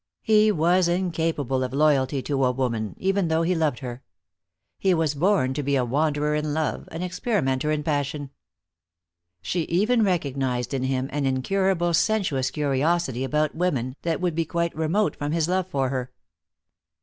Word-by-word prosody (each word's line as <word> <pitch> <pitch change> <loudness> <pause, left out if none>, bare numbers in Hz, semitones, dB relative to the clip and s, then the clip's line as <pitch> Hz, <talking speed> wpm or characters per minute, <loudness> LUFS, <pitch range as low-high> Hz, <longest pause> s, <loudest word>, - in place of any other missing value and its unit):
He 215 0 +4
was 175 +1 +3
incapable 165 -7 -1
of 130 - -4
loyalty 140 -2 +2
to 135 0 0
a 125 - +3
woman, 115 -5 -2
even 195 -1 +1
though 160 +1 +1
he 180 +2 +1
loved 155 -6 0
her. 125 -1 -6 0.8
He 190 -2 +3
was 160 -3 +1
born 155 -4 +2
to 145 - -2
be 140 0 0
a 130 -2 +1
wanderer 150 +3 0
in 150 0 -1
love, 155 -1 -2
an 165 +2 -4
experimenter 170 - -1
in 155 -1 0
passion. 145 -2 -2 1.1
She 175 - -1
even 215 +8 +2
recognized 135 - -1
in 130 -1 -1
him 130 0 -1
an 145 -2 0
incurable 175 +6 +1
sensuous 165 -10 +1
curiosity 145 -1 0
about 150 +2 0
women, 135 -8 -1
that 165 -2 -1
would 180 -2 0
be 165 +1 0
quite 170 +1 -2
remote 160 +7 0
from 145 +1 -3
his 165 -1 +1
love 185 0 0
for 135 -7 -1
her. 130 -1 -3
150 Hz, 165 wpm, -24 LUFS, 135-175 Hz, 1.1 s, He